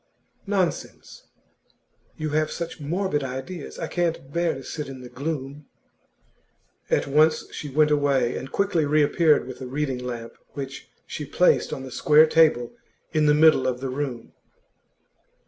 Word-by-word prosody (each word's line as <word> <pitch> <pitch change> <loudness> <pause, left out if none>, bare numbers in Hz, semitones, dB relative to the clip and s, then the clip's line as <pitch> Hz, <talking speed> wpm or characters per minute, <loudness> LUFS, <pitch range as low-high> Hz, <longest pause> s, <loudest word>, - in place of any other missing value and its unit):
'Nonsense; 190 -4 -3 0.9
you 155 -1 -3
have 155 +1 +1
such 170 -1 -5
morbid 160 0 -1
ideas. 135 +6 -6
I 165 - -3
can't 165 -5 -2
bear 170 -2 +1
to 135 - -8
sit 150 +2 -6
in 130 -1 -9
the 125 - -10
gloom.' 140 0 -5 1.2
At - - +2
once 155 +3 +3
she 150 - -6
went 150 +2 +3
away, 140 -4 +2
and 130 - -6
quickly 195 -5 +1
reappeared 150 +1 +3
with 130 0 -9
a 130 - -5
reading 135 -1 -2
lamp, 120 -2 -6 0.2
which 135 -2 -7 0.2
she - - -6
placed - - +2
on 130 - -5
the 130 - -8
square 150 +5 +5
table 155 -6 +3 0.4
in 155 -1 +3
the 150 - +5
middle 155 -4 +5
of 125 -1 -1
the 135 0 -4
room. 130 -3 -4
145 Hz, 150 wpm, -24 LUFS, 130-160 Hz, 1.2 s, square